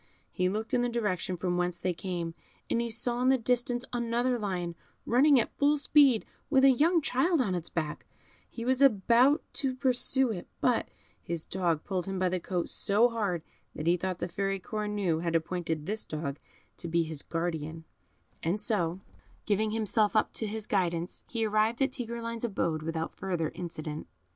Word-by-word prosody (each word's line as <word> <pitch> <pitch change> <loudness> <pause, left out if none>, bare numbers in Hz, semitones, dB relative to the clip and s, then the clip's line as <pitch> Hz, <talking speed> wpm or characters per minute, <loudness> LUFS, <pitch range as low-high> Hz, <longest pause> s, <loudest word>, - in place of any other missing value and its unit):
He 180 0 +1
looked 215 +3 -3
in 245 - +3
the 245 - +1
direction 205 -6 -1
from 175 +1 -1
whence 175 0 0
they 180 +1 -1
came, 170 -2 -4 0.4
and 235 - +2
he 235 - -2
saw 240 +2 -1
in 255 - +4
the 265 - +5
distance 245 +1 0
another 240 +1 0
lion, 180 -5 -2 0.3
running 270 +3 +5
at 230 - -2
full 290 +1 +4
speed, 280 -5 +4 0.2
with 270 -2 +5
a 270 - +8
young 325 +7 +3
child 315 +7 +2
on 210 -8 +1
its 175 -2 -2
back; 155 -3 -3 0.4
he 230 - -6
was 260 +1 +2
about 250 - +5
to 265 -3 0
pursue 260 -1 +2
it, 180 -5 -6
but 245 -2 +1 0.3
his 170 -1 -4
dog 170 -4 0
pulled 190 -2 -2
him 195 0 -3
by 185 0 +2
the 180 0 -1
coat 175 0 -2
so 215 +5 +3
hard 200 -8 -1 0.3
that 155 - -5
he 170 +1 +4
thought 185 0 -3
the - - -3
Fairy 195 +2 -2
Cornue 205 -5 -1
had 170 -1 -1
appointed 165 -2 -1
this 215 +4 -2
dog 150 -2 -4 0.4
to 170 - -6
be 170 0 +2
his 160 -3 -4
guardian, 165 -1 -3 0.6
and 175 +6 0
so, 190 -5 0 0.4
giving 215 +1 +1
himself 215 0 +1
up 215 - +2
to 220 - -2
his 215 0 -4
guidance, 175 -4 -1
he 230 -2 -1
arrived 215 +2 +2
at 270 0 +2
Tigreline's 230 -2 -4
abode 170 -8 -1
without 160 +1 -3
further 175 -5 -2
accident. 155 -3 -6
205 Hz, 180 wpm, -29 LUFS, 175-240 Hz, 0.6 s, a